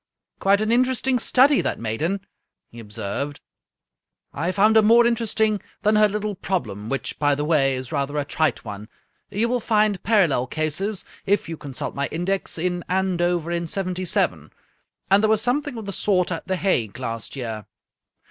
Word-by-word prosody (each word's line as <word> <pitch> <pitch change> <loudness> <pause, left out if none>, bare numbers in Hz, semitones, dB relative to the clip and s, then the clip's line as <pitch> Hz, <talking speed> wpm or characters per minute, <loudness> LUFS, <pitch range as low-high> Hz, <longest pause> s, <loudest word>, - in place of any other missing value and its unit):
" - - -64
Quite 200 +1 +3
an 215 +1 0
interesting 255 +1 +2
study, 270 +4 +4
that - - -2
maiden," 155 - -2 0.5
he 120 - -11
observed. 110 +6 -4 0.5
" - - -55
I 175 - +1
found 210 +3 +3
her 220 - +8
more 230 +3 +6
interesting 220 -3 +1 0.2
than 210 +1 +3
her 210 0 +6
little 210 0 -3
problem, 110 - -3
which, 135 - -3
by 145 -1 +3
the 145 +1 -2
way, 140 -4 +3
is 130 -1 -6
rather 145 0 -2
a 145 - 0
trite 150 -4 0
one. 105 +1 -8 0.4
You 215 +4 0
will 245 +1 0
find 215 -4 +1
parallel 175 - +2
cases, 160 - -2 0.2
if 200 -1 +1
you 165 - -4
consult 140 -4 -5
my. 140 0 -1
index, 185 +4 -2
in 175 +1 -2
Andover 175 -2 0
in 170 0 -1
'yy, 185 0 -1 0.6
and 195 +1 +6
there 215 - +2
was 220 0 +4
something 250 0 0
of 220 - -6
the 200 - -4
sort 185 -3 +1
at 165 +1 -4
The 190 - 0
Hague 120 - 0
last 115 -2 -5
year. 110 -6 -5
180 Hz, 175 wpm, -23 LUFS, 140-210 Hz, 0.6 s, her